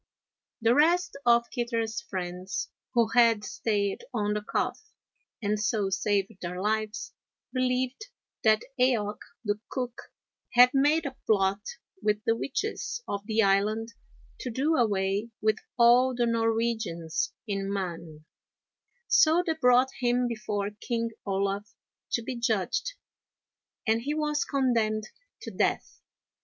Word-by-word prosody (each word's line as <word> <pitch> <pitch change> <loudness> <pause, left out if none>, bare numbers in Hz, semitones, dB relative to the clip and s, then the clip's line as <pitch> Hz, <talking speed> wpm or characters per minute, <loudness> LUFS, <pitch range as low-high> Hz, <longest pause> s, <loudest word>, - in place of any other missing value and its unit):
The 230 +1 +5
rest 345 +5 +3
of 235 0 +5
Kitter's 230 -3 -2
friends, 185 -1 -4 0.3
who 230 -2 +4
had 230 -2 +4
stayed 200 -1 -1
on 210 -4 0
the 210 - -1
Calf 210 - -2 0.6
and 210 +1 0
so 210 -2 0
saved 200 +1 +1
their 180 +1 -4
lives, 215 +2 -2 0.4
believed 255 - 0 0.4
that 215 0 +4 0.2
Eaoch, 220 -5 +2 0.3
the 205 0 0
cook, 245 -2 -5 0.4
had 245 +1 +8
made 295 +4 +3
a 270 -2 -4
plot 200 -1 +2 0.4
with 210 0 +1
the 225 - +3
witches 410 - -3
of 200 0 -3
the 220 0 +3
island 210 +4 +1 0.5
to 255 - -4
do 275 +7 +1
away 205 -2 +1
with 215 0 +2 0.2
all 245 +2 +5
the 240 0 +2
Norwegians 225 -8 0
in 195 -1 -2
Mann, 170 -5 -5 0.8
so 330 +3 +5
they 325 - +1
brought 255 -3 +4
him 245 0 +2
before 210 -3 -3
King 230 -2 -2 0.2
Olaf 200 +1 -1 0.4
to 235 - +1
be 250 - -4
judged, 235 - 0 0.9
and 225 0 +2
he 290 +5 -2
was 300 -1 0
condemned 225 -5 +1 0.3
to - - -6
death. - - -1
225 Hz, 125 wpm, -28 LUFS, 205-250 Hz, 0.9 s, had